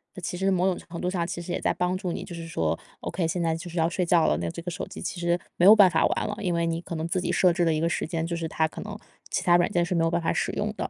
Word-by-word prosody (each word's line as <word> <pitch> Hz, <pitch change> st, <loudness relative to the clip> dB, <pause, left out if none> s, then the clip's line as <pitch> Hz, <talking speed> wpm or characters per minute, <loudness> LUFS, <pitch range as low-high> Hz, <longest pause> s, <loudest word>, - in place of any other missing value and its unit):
那 185 Hz, -, -8 dB
其 180 Hz, -, -4 dB
实 195 Hz, +1 st, +1 dB
某 185 Hz, 0 st, +2 dB
种 185 Hz, -, -1 dB
程 170 Hz, 0 st, -8 dB
度 180 Hz, -, 0 dB
上 175 Hz, -2 st, -1 dB
其 175 Hz, -1 st, -4 dB
实 175 Hz, -, -6 dB
也 -, -, -1 dB
在 -, -, +1 dB
帮 180 Hz, +1 st, 0 dB
助 185 Hz, -3 st, -3 dB
你 -, -, -5 dB
就 190 Hz, -, -9 dB
是 165 Hz, -1 st, -7 dB
说 80 Hz, -, -1 dB, 0.2 s
，OK， 175 Hz, -3 st, -2 dB
现 175 Hz, +2 st, -2 dB
在 165 Hz, -1 st, +1 dB
就 175 Hz, +2 st, -7 dB
是 175 Hz, -, -8 dB
要 165 Hz, 0 st, +3 dB
睡 180 Hz, +1 st, -1 dB
觉 170 Hz, -1 st, +4 dB
了， 75 Hz, -, +2 dB
那 85 Hz, -1 st, -2 dB
这 170 Hz, -, -7 dB
个 175 Hz, +1 st, -5 dB
手 -, -, -5 dB
机 -, -, -9 dB
其 175 Hz, -, -4 dB
实 170 Hz, 0 st, +1 dB, 0.2 s
没 175 Hz, -, +4 dB
有 210 Hz, +3 st, +10 dB
办 200 Hz, -3 st, +7 dB
法 -, -, +3 dB
玩 -, -, 0 dB
了， 210 Hz, 0 st, -4 dB
因 185 Hz, -4 st, -1 dB
为 170 Hz, 0 st, +1 dB
你 165 Hz, 0 st, -1 dB
可 170 Hz, -, -6 dB
能 160 Hz, 0 st, -3 dB
自 180 Hz, +2 st, 0 dB
己 -, -, -3 dB
设 180 Hz, -, +4 dB
置 175 Hz, 0 st, +1 dB
了 165 Hz, -, +3 dB
一 155 Hz, -, 0 dB
个 165 Hz, -, +2 dB
时 160 Hz, -, -2 dB
间， 165 Hz, 0 st, -2 dB
就 170 Hz, 0 st, -3 dB
是 165 Hz, -1 st, -3 dB
它 160 Hz, 0 st, 0 dB
可 -, -, -10 dB
能 210 Hz, 0 st, -7 dB, 0.3 s
其 -, -, -1 dB
他 175 Hz, -1 st, +5 dB
软 175 Hz, -, +2 dB
件 175 Hz, -2 st, +2 dB
是 180 Hz, -, -2 dB
没 165 Hz, -, +2 dB
有 165 Hz, -, +2 dB
办 170 Hz, 0 st, 0 dB
法 165 Hz, -, 0 dB
使 -, -, -1 dB
用 -, -, -2 dB
的。 -, -, -3 dB
175 Hz, 395 characters per minute, -26 LUFS, 165-180 Hz, 0.3 s, 有